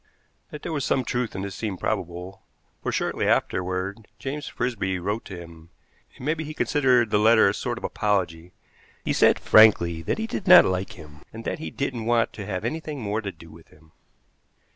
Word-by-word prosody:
That 150 - -9
there - - -4
was 145 -3 -1
some 130 -2 0
truth 125 -3 -2
in 95 - -3
this 100 -1 -5
seemed 100 -2 -4
probable, 90 -1 -4 0.4
for - - -2
shortly - - -1
afterward 95 +3 -1
James 145 +2 -5
Frisby 105 -7 -2
wrote 105 +5 -3
to 95 -3 -8
him. 85 -1 -13 0.5
It - - -15
may 150 +3 +1
be 160 -1 -5
he 155 0 -7
considered 125 -8 +2
the 105 - +3
letter 110 0 +6
a 100 - +2
sort 120 +2 -3
of - - -9
apology. 90 -5 -1 0.5
He - - +1
said - - +4
frankly 85 -7 +5
that 80 - -2
he 220 - -2
did 225 -4 -5
not 180 0 +9
like 95 0 -2
him, 75 -1 -13
and 115 +1 -9
that - - -3
he 160 - -5
didn't 125 -5 -3
want 120 -1 +2
to 105 -3 -7
have 95 -3 -3
anything 155 -2 -4
more 110 -1 -2
to 100 -2 -5
do 85 -3 -15
with 80 0 -16
him. 80 0 -22
105 Hz, 205 wpm, -25 LUFS, 90-125 Hz, 0.5 s, not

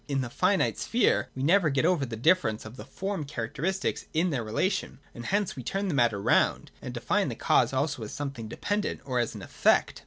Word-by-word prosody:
In 140 -2 0
the 120 -2 -5
finite 185 +6 +1
sphere 240 +1 +2
we 130 - -3
never 170 +2 +4
get 135 -2 +1
over 165 -7 +2
the 115 - -5
difference 115 -4 +2
of 110 +2 -9
the - - -9
form 190 +5 -4
characteristics 145 - -3
in 170 +2 +2
their 130 -5 -1
relation: 115 - -1 0.2
and 120 - -7
hence 200 -1 0
we 130 - -6
turn 195 +10 -2
the - - -1
matter 120 -6 +2
round - - +2
and - - -6
define - - 0
the - - -4
cause - - +3
also 140 0 -1
as 110 - -6
something 135 -6 -5
dependent 205 - -2
or 130 -2 -1
as 120 - -1
an - - -8
effect. - - +2
140 Hz, 215 wpm, -28 LUFS, 120-185 Hz, 0.2 s, never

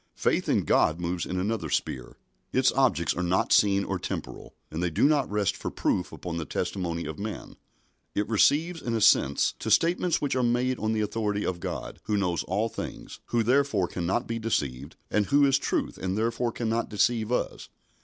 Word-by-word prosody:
Faith - - 0
in - - +2
God 80 +2 +2
moves 85 0 -2
in 90 - -2
another 105 +4 -2
sphere. 60 -2 -3 0.3
Its 130 0 +3
objects 125 - +2
are 90 - -2
not 90 +1 +1
seen 100 -1 +4
or - - -3
temporal, - - -6 0.2
and 80 +2 -3
they 90 - +1
do 80 - 0
not 145 -2 +3
rest 105 -2 0
for - - -4
proof 90 - -1
upon 85 -2 -5
the 85 - -2
testimony 85 0 -3
of 80 - -6
man. 105 +1 -6 0.6
It 105 - 0
receives 155 - +2
and 115 -1 -2
assents 70 -9 +4
to - - -4
statements 175 0 +3
which 140 -3 -1
are 130 - +2
made 125 +1 +1
on 110 +1 0
the 110 - 0
authority 105 -1 -1
of 90 -2 -2
God, - - -5
who 105 - 0
knows 90 -4 0
all 105 +5 0
things, - - -7
who 120 -1 +1
therefore 125 -6 +2
cannot 90 +1 -1
be 115 0 -3
deceived, 75 - -2 0.2
and 105 -1 +1
who 145 0 +4
is 135 0 +3
truth - - -2
and 95 +1 -2
therefore 115 +2 0
cannot 115 0 -2
deceive 110 +2 +1
us. 125 - -2
105 Hz, 195 wpm, -27 LUFS, 90-120 Hz, 0.6 s, seen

